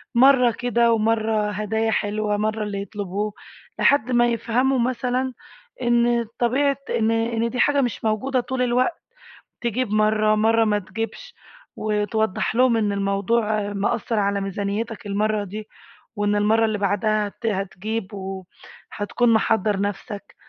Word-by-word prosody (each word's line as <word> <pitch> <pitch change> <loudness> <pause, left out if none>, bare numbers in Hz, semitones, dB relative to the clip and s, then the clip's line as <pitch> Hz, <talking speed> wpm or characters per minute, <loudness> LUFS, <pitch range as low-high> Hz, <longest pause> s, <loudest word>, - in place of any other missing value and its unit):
مَرّة 250 -1 +6
كده، 235 0 +2
ومَرّة 220 -1 +1
هدايا 220 +2 -1
حلوة، 210 0 0
مَرّة 215 +1 -1
اللي 200 -1 -3
يطلبوه، 205 0 -4 0.5
لحد 255 -3 +3
ما 240 0 +4
يفهموا 240 +3 +1
مثلًا 255 +1 -1 0.5
إن 240 0 +2
طبيعة 270 +3 +2
إن 225 0 +1
إن 230 0 0
دي 250 - -5
حاجة 285 -1 +3
مش 245 -3 -2
موجودة 255 +5 0
طول 255 +1 -3
الوقت، 250 +6 +1 0.6
تجيب 240 -1 -1
مَرّة، 215 0 +3
مَرّة 225 +1 +3
ما 210 -1 +2
تجيبش، 225 - -6 0.4
وتوضح 215 0 -1
لهم 250 -2 +4
إن 210 -2 +1
الموضوع 205 +1 0
مأثر 215 +2 -1
على 200 0 0
ميزانيتك 200 +3 -3
المَرّة 210 +1 0
دي، 210 +2 -7 0.5
وإن 205 0 +1
المَرّة 220 +2 +3
اللي 215 -1 -1
بعدها 205 +1 +1
هت 215 +3 -11
هتجيب، 205 +1 -3
وهتكون 195 +4 -3
محضّر 220 -2 +2
نفسك. 205 0 -5
220 Hz, 130 wpm, -23 LUFS, 205-235 Hz, 0.6 s, مَرّة